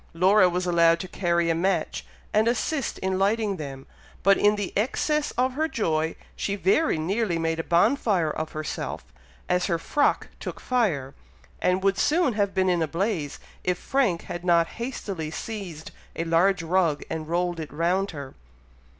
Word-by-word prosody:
Laura 185 +2 +5
was 180 +1 -1
allowed 170 -1 +4
to 185 - -5
carry 170 -2 +1
a - - +3
match, 185 +4 0 0.3
and 215 +2 +3
assist 255 +3 -1
in 190 0 -1
lighting 205 0 +1
them, 135 -3 -7 0.4
but 195 +1 +6
in 210 +1 +3
the 205 -3 -4
excess 290 +7 0
of 255 +1 +2
her 310 +4 0
joy, 160 - -1 0.2
she 200 - -2
very 200 - +2
nearly 185 +3 0
made 165 0 -1
a - - -1
bonfire 185 - +2
of 155 +1 -4
herself, 155 0 -4 0.4
as 180 0 +1
her 170 - +1
frock 285 - +1
took - - -6
fire, 170 - 0 0.5
and 180 +1 +1
would 195 0 +2
soon 320 -4 +2
have 200 -2 0
been 190 0 +2
in 175 -2 +2
a 160 - +1
blaze, 165 -3 -2 0.3
if 180 -1 0
Frank 235 -11 0
had 175 - -6
not 170 -2 +4 0.2
hastily 195 -10 -4
seized 180 -4 -6 0.2
a 165 - -1
large 170 +2 +2
rug 165 -3 +1
and 160 -1 -4
rolled 175 0 0
it 155 - -6
round 175 +6 0
her. 140 -4 -8
180 Hz, 170 wpm, -25 LUFS, 165-210 Hz, 0.5 s, but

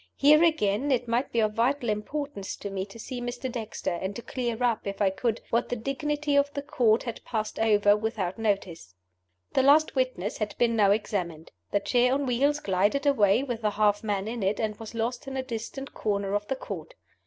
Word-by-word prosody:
Here, 305 +3 +6
again, 280 -5 +2
it 245 -2 +1
might 240 +4 0
be 230 - +2
of 215 -1 +1
vital 245 +4 +1
importance 215 +1 -3
to 200 - -7
me 190 0 -3
to 200 - -12
see 245 +2 -6
Mr. 245 +1 -4
Dexter, 225 -5 -4
and 190 +1 -3
to 235 - -7
clear 240 -2 -3
up, 235 -4 +1
if 200 - -4
I 200 -2 +3
could, 225 +3 -1
what 235 - +1
the - - -1
dignity 290 +4 -1
of 285 0 +3
the 280 - -3
Court 240 -6 +2
had 235 -3 -6
passed 215 -2 -3
over 205 -2 +4
without 210 -3 -3
notice. 185 - -2 0.6
The - - +4
last 290 +4 +5
witness 255 -7 -1
had 215 -1 -3
been 235 -1 +2
now 205 -3 +4
examined. 180 -6 -1 0.2
The 205 - +1
chair 250 +4 +3
on 285 0 -1
wheels 275 +4 +2
glided 205 +7 +1
away 225 -4 +4
with 240 -4 -4
the 215 - +2
half 205 0 +2
man 205 -2 -1
in 230 0 -4
it, 195 +2 0
and 215 -2 -1
was 225 0 -8
lost 235 +3 -2
in 270 0 -4
a 260 - -1
distant 260 +3 -6
corner 200 -2 -1
of 205 0 -1
the 270 - -1
Court. - - -7
225 Hz, 210 wpm, -27 LUFS, 205-260 Hz, 0.6 s, Here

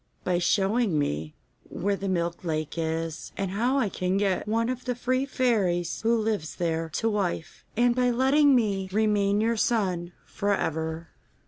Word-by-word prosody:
'By 180 -1 +1
showing 195 +1 +2
me 80 - -2 0.3
where 200 +2 -1
the 195 0 -4
Milk 170 -1 -1
Lake 155 -3 -2
is, 165 -1 -3
and 195 -2 -2
how 240 +7 +1
I 255 -6 +2
can 185 0 -1
get 195 -1 0
one 230 +2 +1
of 255 0 -4
the 250 -1 -1
three 255 +2 0
fairies 195 -11 0
who 230 +1 +3
lives 215 -8 -2
there 165 -1 -1
to 225 - 0
wife, 190 -6 -2
and 240 0 +4
by 250 0 +2
letting 270 +3 +4
me 200 -5 0
remain 205 -1 +2
your 230 +1 +1
son 185 -7 0
for 200 0 0
ever. 160 -1 -3
200 Hz, 165 wpm, -27 LUFS, 170-230 Hz, 0.3 s, and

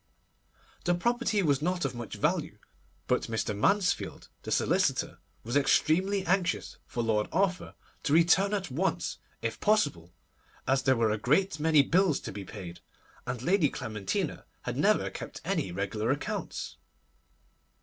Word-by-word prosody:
The 175 0 +3
property 225 +1 +1
was 145 -4 +2
not 180 +2 0
of - - -1
much 120 -4 -6
value; - - 0 0.5
but - - 0
Mr. 110 -2 -2
Mansfield, 195 - +1
the - - -8
solicitor, - - +1 0.2
was 120 +4 -4
extremely 185 +7 +3
anxious 180 -1 0
for 120 - -2
Lord 105 -2 +1
Arthur 185 0 0 0.3
to 145 - 0
return 170 +5 +5
at 195 -8 -4
once, 180 +9 -1 0.2
if - - -2
possible, 150 - +1 0.6
as 135 +1 +3
there 130 0 +3
were 115 -2 +2
a 105 - -1
great 160 - +2
many 155 -2 +5
bills 175 -1 +2
to - - -6
be 100 0 -6
paid, 90 -4 -9 0.5
and 125 -1 -3
Lady 175 -2 +3
Clementina 110 -8 -3 0.2
had - - -3
never - - +2
kept - - -7
any 95 - -1
regular 100 +4 -2
accounts. 140 +2 -3
150 Hz, 145 wpm, -29 LUFS, 110-185 Hz, 0.6 s, return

